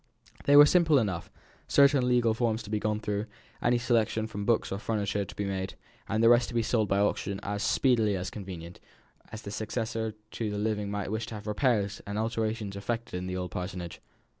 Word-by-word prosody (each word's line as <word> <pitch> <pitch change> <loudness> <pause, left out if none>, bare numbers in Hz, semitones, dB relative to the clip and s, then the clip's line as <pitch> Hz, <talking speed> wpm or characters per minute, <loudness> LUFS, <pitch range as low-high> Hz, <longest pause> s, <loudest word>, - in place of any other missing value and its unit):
These 145 - +5
were 145 - +11
simple 160 -2 +4
enough; 100 -9 -1 0.4
certain 140 -2 +5
legal 120 -2 +3
forms 115 -1 0
to 105 - -9
be 105 - +1
gone 105 0 -1
through, 105 0 -2 0.3
any 120 0 +3
selection 115 -2 +1
from 100 -2 -5
books 115 -2 +2
or 95 - -2
furniture 105 -2 -1
to - - -11
be 100 - -2
made, 95 -1 -3 0.3
and 110 +2 +1
the 115 - +7
rest 120 0 +5
to 120 - -7
be 115 - +2
sold 110 -2 +1
by 100 - +1
auction 100 -1 0
as 100 0 -3
speedily 115 -6 +2
as 95 +2 -4
convenient, 90 -4 -8 0.5
as 110 - -8
the 100 - -6
successor 110 0 -3 0.2
to 110 -2 -3
the 105 - -3
living 105 -1 -1
might 100 -1 -3
wish 110 0 -2
to 115 - -6
have 105 0 -8
repairs 105 -2 0
and 100 +1 -3
alterations 110 -2 -2
effected 115 +4 -4
in 90 0 -3
the 90 0 -3
old 90 -1 -4
parsonage. 90 -2 -5
110 Hz, 210 wpm, -29 LUFS, 100-115 Hz, 0.5 s, were